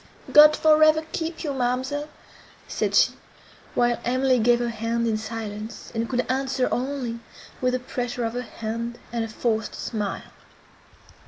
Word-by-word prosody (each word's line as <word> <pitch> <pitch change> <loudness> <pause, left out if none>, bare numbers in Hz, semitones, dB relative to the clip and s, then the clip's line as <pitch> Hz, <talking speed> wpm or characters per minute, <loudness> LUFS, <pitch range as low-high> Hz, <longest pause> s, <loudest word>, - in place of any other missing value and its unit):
"God 300 0 +9
for 310 0 +5
ever 310 0 +5
keep 325 +1 -4
you, 295 -3 -2
ma'amselle!" 260 +4 -1 0.6
said - - -1
she, - - +6 0.6
while 240 -1 +2
Emily 255 +1 +2
gave 240 +2 +4
her 240 0 -1
hand 230 +1 -1
in 225 - +1
silence, 220 0 -6
and 230 0 -2
could 250 -1 0
answer 260 0 0
only 250 -3 -2 0.4
with 255 0 +2
a - - -1
pressure 245 -1 -4
of 225 - -2
her 245 - -2
hand, 230 0 -5 0.2
and 235 -1 0
a - - -3
forced 220 0 -2
smile. 210 -4 -4
245 Hz, 155 wpm, -24 LUFS, 230-265 Hz, 0.6 s, God